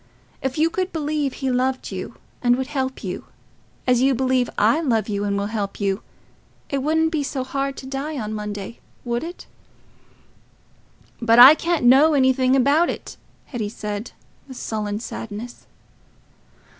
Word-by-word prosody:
If 265 +1 -3
you 320 +2 +2
could 370 +1 -2
believe 300 -3 -1
he 265 -1 -2
loved 255 +1 -1
you - - -6 0.3
and 245 -1 +4
would 260 +1 -2
help 265 -2 -3
you, - - -5 0.6
as 250 -1 +3
you 265 0 +3
believe 255 0 +1
I 230 +10 +3
love 230 -8 +1
you 205 -2 -2
and 200 0 0
will 200 - -1
help 200 -3 -3
you, 200 0 0 0.7
it 280 - 0
wouldn't 320 +3 +1
be 315 -3 0
so 275 -2 -3
hard 275 +1 -3
to - - -8
die 275 +3 -4
on 215 -3 -4
Monday, 210 +1 -6 0.3
would 240 +2 -1
it?" 345 +2 -8 1.8
"But 230 0 +4
I 255 +4 +11
can't 335 -3 -1
know 285 +5 +6
anything 260 -1 +3
about 285 +6 +3
it," - - -6 0.3
Hetty 225 -6 -4
said, 210 +1 -5 0.4
with 260 -2 -10
sullen 210 -1 -3
sadness. 225 +1 -7
260 Hz, 155 wpm, -22 LUFS, 225-280 Hz, 1.8 s, I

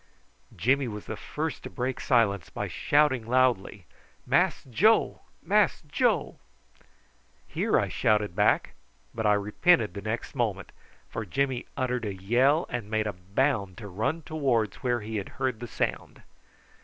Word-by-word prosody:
Jimmy 130 +8 +2
was 105 -2 -7
the - - -5
first 155 +1 -4
to - - -8
break 130 0 -3
silence 110 - +2
by - - -4
shouting 145 -5 +2
loudly: 120 -6 +1 0.4
"Mass - - +2
Joe! 210 - +2 0.2
Mass 205 +2 +2
Joe!" - - 0 1.1
"Here!" - - +1
I - - 0
shouted 105 -4 +1
back; - - +2 0.4
but 110 -1 -1
I 105 - +5
repented 105 - +2
the 100 - -6
next 110 +3 -4
moment, - - -2 0.4
for 115 - -5
Jimmy 130 +6 -1
uttered 125 -2 -1
a 100 -2 -3
yell 125 - +2
and 120 -4 -5
made 110 0 0
a 105 - -2
bound 100 +1 -1
to 105 - -8
run 110 - -2
towards 130 -10 0
where 120 -3 -1
he 110 +1 -4
had 100 - -4
heard 130 -4 -1
the 120 - -6
sound. - - -3
120 Hz, 150 wpm, -27 LUFS, 105-135 Hz, 1.1 s, I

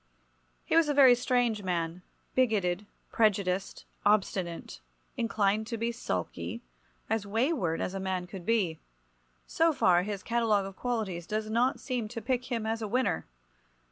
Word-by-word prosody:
He - - 0
was 330 -2 +5
a 290 - +1
very 265 -3 +8
strange 245 -3 +1
man, 175 -2 -2 0.3
bigoted, 205 -6 +1 0.2
prejudiced, 195 -4 +1 0.2
obstinate, 190 - 0 0.4
inclined 215 -2 +1
to 230 - -3
be 230 +1 -1
sulky, 235 - -4 0.4
as 220 -2 -1
wayward 225 - 0
as 185 - -2
a 195 - -3
man 190 -1 -2
could 180 0 -9
be. 185 -6 +1 0.7
So 330 0 +2
far 180 - +4
his 200 0 -4
catalogue 225 -4 +2
of 195 -1 -8
qualities 205 -9 -3
does 215 0 -2
not 245 +4 +2
seem 250 -5 -2
to 225 - -6
pick 250 +2 -1
him 230 -2 -1
as 225 +1 -1
a 215 - -2
winner. 225 - 0
215 Hz, 150 wpm, -30 LUFS, 190-235 Hz, 0.7 s, very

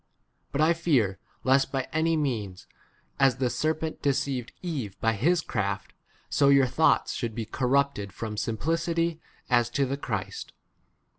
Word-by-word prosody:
But 140 - 0
I 160 +2 +5
fear 135 - +1 0.2
lest 135 +1 +3
by 135 -2 -2
any 160 +1 +2
means, 105 -10 -2 0.5
as 135 -3 +5
the 125 -1 0
serpent 155 0 -2
deceived 135 -3 -1
Eve 135 - -4
by 115 0 +2
his 160 - +2
craft, 100 -7 -3 0.3
so 140 - +3
your 140 -1 +6
thoughts 145 +6 +2
should 115 -3 -3
be 115 - -3
corrupted 130 -3 0
from 110 +3 -5
simpli 110 0 -3
4 165 +3 +2
city 165 0 0
h 160 - -14 0.3
as 120 -1 +4
to 140 +3 +1
the 135 +2 -2
Christ. 105 -8 -4
135 Hz, 160 wpm, -27 LUFS, 115-155 Hz, 0.5 s, your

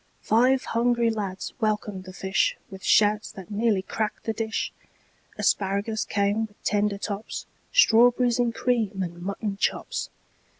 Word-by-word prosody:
Five 255 +4 +3
hungry 235 0 +2
lads 200 -4 -4
welcomed 210 -4 -1
the 185 - -8
fishWith 190 0 -1
shouts 210 +1 +3
that 190 0 -10
nearly 210 -2 +1
cracked 215 +2 -3
the 225 - -1
dish; 220 0 -2 0.6
Asparagus 200 +3 0
came 205 +2 0
with 205 - -28
tender 205 -1 +1
tops, 205 +1 -5 0.3
Strawberries 245 - +5
in 240 -1 +2
cream, 225 -5 0
and 175 -1 -7
mutton 200 +2 -3
chops. - - -1
210 Hz, 130 wpm, -26 LUFS, 200-230 Hz, 0.6 s, Strawberries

